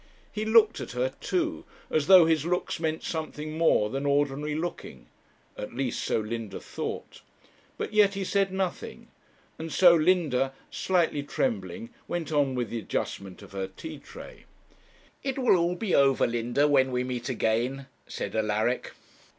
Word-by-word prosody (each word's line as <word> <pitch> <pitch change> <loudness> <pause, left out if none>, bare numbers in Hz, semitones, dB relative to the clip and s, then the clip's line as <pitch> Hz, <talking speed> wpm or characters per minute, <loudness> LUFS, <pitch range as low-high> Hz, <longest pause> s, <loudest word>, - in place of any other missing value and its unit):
He 215 0 -3
looked 220 0 +5
at - - -6
her 130 +2 -1
too, 335 -3 -1 0.3
as 155 -2 +1
though 185 -3 +9
his 160 -2 +2
looks 175 0 -1
meant 160 -1 -2
something 155 -1 -4
more 160 -10 +3
than 135 +2 -2
ordinary 145 +1 0
looking; 170 +2 -5 0.5
at 105 - -7
least 130 -1 -2
so - - +1
Linda 110 -1 -5
thought; - - -6 0.6
but - - -4
yet 205 -2 +4
he 195 - -2
said 195 0 +1
nothing, 190 -1 -4 0.5
and 160 0 -5
so 175 -2 +7
Linda, 155 -6 +2 0.2
slightly 170 -5 +1
trembling, 230 - -3 0.2
went 170 -2 -3
on 145 -3 +2
with 120 -3 -2
the 115 - -2
adjustment 100 -2 -4
of 100 - -14
her 95 -1 -3
tea 150 +10 -9
tray. - - -12 0.8
'It 270 -1 -3
will 180 -9 +3
be 185 0 -2
all - - +6
over, 135 -1 +3
Linda, 120 +5 +1
when 135 -2 +3
we 125 0 0
meet 125 0 -4
again,' 125 +3 0 0.2
said - - -5
Alaric. 110 +3 0
150 Hz, 160 wpm, -27 LUFS, 125-180 Hz, 0.8 s, though